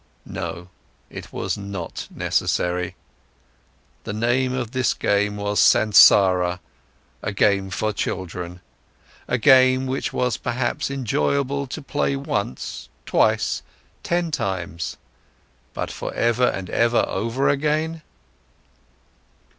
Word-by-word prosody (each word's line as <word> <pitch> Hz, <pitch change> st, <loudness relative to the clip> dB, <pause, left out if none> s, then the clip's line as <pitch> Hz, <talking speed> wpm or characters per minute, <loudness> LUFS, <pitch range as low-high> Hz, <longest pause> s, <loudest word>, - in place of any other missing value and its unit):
No, 90 Hz, +1 st, -6 dB, 0.4 s
it -, -, -9 dB
was -, -, -3 dB
not 100 Hz, -4 st, -6 dB
necessary! 90 Hz, +1 st, -1 dB, 1.1 s
The -, -, -5 dB
name 120 Hz, +4 st, +1 dB
of 125 Hz, -3 st, -3 dB
this 130 Hz, -3 st, +1 dB
game 105 Hz, 0 st, +1 dB
was 105 Hz, 0 st, -1 dB
Sansara, 95 Hz, -4 st, +6 dB, 0.6 s
a -, -, -3 dB
game 100 Hz, -1 st, +2 dB
for 105 Hz, +3 st, -1 dB
children, 90 Hz, -2 st, -4 dB, 0.7 s
a 125 Hz, -, +1 dB
game 130 Hz, 0 st, +5 dB
which 135 Hz, +1 st, -2 dB
was 125 Hz, -3 st, 0 dB
perhaps 120 Hz, +2 st, -2 dB
enjoyable 140 Hz, -, -1 dB
to 150 Hz, +4 st, -7 dB
play 140 Hz, 0 st, -1 dB
once, 105 Hz, -, -4 dB, 0.2 s
twice, -, -, +2 dB, 0.4 s
ten 175 Hz, -1 st, -1 dB
times—but 85 Hz, -, -6 dB
for -, -, -5 dB
ever 120 Hz, +2 st, +2 dB
and 95 Hz, -1 st, -3 dB
ever 120 Hz, +1 st, +3 dB
over 115 Hz, +7 st, -1 dB
again? 155 Hz, +3 st, 0 dB
115 Hz, 105 wpm, -22 LUFS, 95-130 Hz, 1.1 s, Sansara